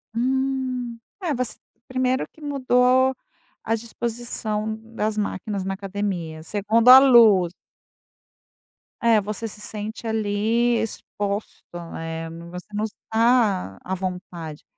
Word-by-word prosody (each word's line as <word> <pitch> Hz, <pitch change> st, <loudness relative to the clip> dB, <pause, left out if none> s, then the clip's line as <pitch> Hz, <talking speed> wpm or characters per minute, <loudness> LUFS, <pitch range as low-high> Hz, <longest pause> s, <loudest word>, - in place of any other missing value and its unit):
Hum, 255 Hz, -1 st, -1 dB, 0.3 s
é, 330 Hz, -4 st, 0 dB
você 250 Hz, -2 st, -3 dB, 0.3 s
1° 255 Hz, 0 st, 0 dB
que 315 Hz, -, -20 dB
mudou 260 Hz, -2 st, +3 dB, 0.5 s
a 225 Hz, -, +1 dB
disposição 225 Hz, -2 st, -3 dB, 0.2 s
das 215 Hz, 0 st, -1 dB
máquinas 205 Hz, -1 st, -2 dB
na 195 Hz, +1 st, -2 dB
academia, 190 Hz, -5 st, -4 dB
2° 215 Hz, +6 st, +2 dB
a 260 Hz, +1 st, +12 dB
luz. 225 Hz, -10 st, +6 dB, 1.5 s
É, 230 Hz, -2 st, +4 dB
você 210 Hz, +3 st, -4 dB
se 210 Hz, -1 st, -9 dB
sente 215 Hz, +2 st, -5 dB
ali 220 Hz, +2 st, +1 dB
exposto, 205 Hz, -1 st, -4 dB, 0.3 s
né. 165 Hz, 0 st, -5 dB
No 170 Hz, +1 st, -10 dB
você 180 Hz, +1 st, -8 dB
não 210 Hz, +1 st, -1 dB
está 220 Hz, -, +1 dB
à 185 Hz, -, -4 dB
vontade, 180 Hz, -4 st, -5 dB
220 Hz, 115 wpm, -23 LUFS, 195-240 Hz, 1.5 s, a